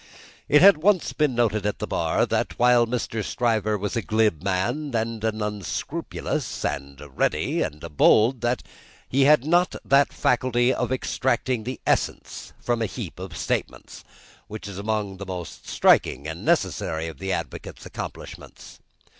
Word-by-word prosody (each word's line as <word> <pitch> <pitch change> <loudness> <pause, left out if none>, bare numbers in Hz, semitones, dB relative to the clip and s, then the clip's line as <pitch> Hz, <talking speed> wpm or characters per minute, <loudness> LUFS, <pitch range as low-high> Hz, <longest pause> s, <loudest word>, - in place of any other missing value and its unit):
It 150 +3 +6
had 200 -2 +8
once 185 +2 +2
been 150 -5 +1
noted 110 -4 +1
at 105 0 -1
the - - -3
Bar, 80 -1 +1
that - - -2
while 120 -1 +4
Mr. 115 -2 -2
Stryver 110 -3 0
was 105 +4 -3
a 115 - 0
glib 110 -7 +1
man, 100 - -1
and 115 -1 -2
an 110 -1 -1
unscrupulous, 105 -4 -4
and 70 0 -4
a 75 - -10
ready, 65 - 0
and 75 +1 -4
a - - -6
bold, 115 - +4 0.6
he 135 +1 +3
had 145 -2 +5
not 175 +3 +2
that 140 +1 +4
faculty 125 0 +2
of - - -2
extracting 130 -2 -1
the 130 +1 -5
essence - - -1
from 120 -1 -1
a 110 - +1
heap - - -7
of - - -7
statements, - - -4 0.4
which 105 -1 -7
is 100 -1 -7
among 105 -2 -2
the 100 - -7
most 90 -3 -7
striking 70 +4 +3
and 80 +1 -6
necessary 80 +1 0
of 80 - -9
the 95 0 -3
advocate's - - -5
accomplishments. - - -9
110 Hz, 160 wpm, -24 LUFS, 95-125 Hz, 0.6 s, had